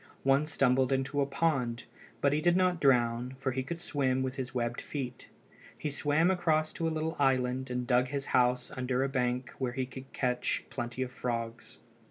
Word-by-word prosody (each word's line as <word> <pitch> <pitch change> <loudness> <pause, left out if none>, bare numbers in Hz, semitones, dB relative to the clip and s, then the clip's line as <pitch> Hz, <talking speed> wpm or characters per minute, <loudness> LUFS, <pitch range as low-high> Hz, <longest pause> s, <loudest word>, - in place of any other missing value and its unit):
One 135 +3 +3
stumbled 130 -3 +2
into 135 +2 +1
a 140 - +1
pond, 135 -6 0 0.4
but 140 0 +3
he 150 - +1
did 175 +1 +4
not 180 -2 +2
drown, 125 -1 +2
for 135 0 -1
he 130 +1 -1
could 165 +6 -5
swim 130 -6 0
with 130 -1 -2
his 130 -2 -4
webbed 120 -2 -2
feet. 130 -4 -5 0.5
He 150 - -3
swam 150 +5 +2
across 155 -4 +1
to 165 - -1
a - - 0
small 160 +1 -2
island 130 -1 +1
and 125 0 -2
dug 125 +1 +3
his 140 +1 -3
house 125 0 +3
under 130 0 -1
a 135 - 0
bank 125 -1 -1
where 125 -2 -1
he 130 +1 -1
could 130 +1 -10
catch 125 -1 0
plenty 120 +2 -3
of 125 - -6
frogs. 115 -2 -4
130 Hz, 195 wpm, -31 LUFS, 125-145 Hz, 0.5 s, did